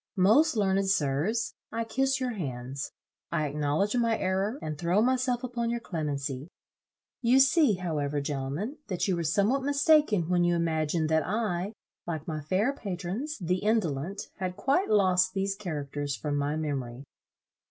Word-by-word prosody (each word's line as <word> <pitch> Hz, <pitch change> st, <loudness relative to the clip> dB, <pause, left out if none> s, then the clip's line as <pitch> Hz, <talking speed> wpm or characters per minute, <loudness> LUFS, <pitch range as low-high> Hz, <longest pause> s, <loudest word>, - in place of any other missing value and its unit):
Most 240 Hz, +12 st, +5 dB
learned 195 Hz, -1 st, +2 dB
sirs, 185 Hz, -, +1 dB, 0.2 s
I 230 Hz, -, -1 dB
kiss 265 Hz, +3 st, 0 dB
your 255 Hz, -1 st, -1 dB
hands. 135 Hz, -, -5 dB, 0.4 s
I 155 Hz, -, 0 dB
acknowledge 150 Hz, -, 0 dB
my 230 Hz, -2 st, +2 dB
error, 195 Hz, +6 st, 0 dB
and 155 Hz, -, -4 dB
throw 175 Hz, +5 st, +1 dB
myself 250 Hz, +1 st, +1 dB
upon 240 Hz, -2 st, -2 dB
your 235 Hz, 0 st, -1 dB
clemency. 145 Hz, -, -3 dB, 0.7 s
You 250 Hz, +2 st, +5 dB
see 270 Hz, -, +5 dB
however, 150 Hz, -5 st, -2 dB
gentlemen, 145 Hz, -, -3 dB
that 185 Hz, 0 st, -1 dB
you 190 Hz, -, +2 dB
were 170 Hz, -, -2 dB
somewhat 200 Hz, -, +2 dB
mistaken, 285 Hz, -, +3 dB
when 175 Hz, 0 st, +2 dB
you 175 Hz, 0 st, +3 dB
imagined 160 Hz, -1 st, 0 dB
that 160 Hz, 0 st, +3 dB
I, 200 Hz, 0 st, -1 dB, 0.3 s
like 160 Hz, -3 st, -4 dB
my 155 Hz, -2 st, -3 dB
fair 190 Hz, -, +1 dB
patrons, 205 Hz, -, -4 dB
the 180 Hz, 0 st, 0 dB
indolent, 195 Hz, -4 st, 0 dB
had 185 Hz, -1 st, -3 dB
quite 275 Hz, -, +1 dB
lost 185 Hz, -2 st, +3 dB
these 195 Hz, 0 st, 0 dB
characters 145 Hz, -7 st, -4 dB
from 145 Hz, +6 st, -3 dB
my 145 Hz, +1 st, 0 dB
memory. 135 Hz, -5 st, -3 dB
185 Hz, 150 wpm, -28 LUFS, 150-230 Hz, 0.7 s, Most